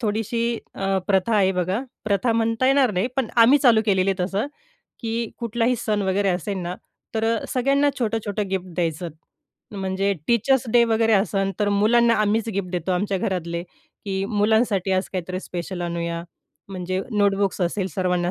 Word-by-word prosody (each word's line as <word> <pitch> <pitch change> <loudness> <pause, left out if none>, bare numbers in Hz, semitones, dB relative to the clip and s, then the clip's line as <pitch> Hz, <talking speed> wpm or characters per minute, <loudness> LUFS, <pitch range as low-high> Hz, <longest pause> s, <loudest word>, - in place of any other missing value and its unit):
थोडीशी 225 +1 -1 0.3
अ, 195 0 0
प्रथा 195 +3 +2
आहे 190 -2 +3
बघा. 185 +4 -1 0.2
प्रथा 215 +3 +1
म्हणता 225 +2 +1
येणार 270 -2 +4
नाही 185 +4 0
पण 265 -4 0
आम्ही 270 +5 +6
चालू 235 -5 +5
केलेली 195 -1 +3
आहे 185 -2 -1
तसं, 200 +7 -1 0.5
की 230 -1 -2
कुठलाही 235 +1 0
सण 210 -2 -1
वगैरे 195 +1 +1
असेन 185 +1 -2
ना, 175 +1 -4 0.4
तर 220 0 0 0.2
सगळ्यांना 275 +3 +2
छोटं-छोटं 215 -3 -2
गिफ्ट 190 -1 -2
द्यायचं 170 0 -2 0.6
म्हणजे 195 0 -1 0.2
टीचर्स 240 +2 +3
डे 240 - +6
वगैरे 225 0 +2
असेन 195 -1 +2
तर 205 - +2
मुलांना 230 +4 +4
आम्हीच 215 +2 +1
गिफ्ट 190 -2 -2
देतो, 180 0 -2
आमच्या 195 +1 0
घरातले. 170 -2 -2 0.4
की 195 -1 -2
मुलांसाठी 210 -2 +1
आज 185 +1 0
काहीतरी 185 0 -3
स्पेशल 180 0 -6
आणूया. 170 -1 -3 0.5
म्हणजे 185 -1 -3
नोटबुक्स 200 -3 +1
असेल 185 +2 0
सर्वांना 180 -1 0
200 Hz, 155 wpm, -23 LUFS, 185-225 Hz, 0.6 s, आम्ही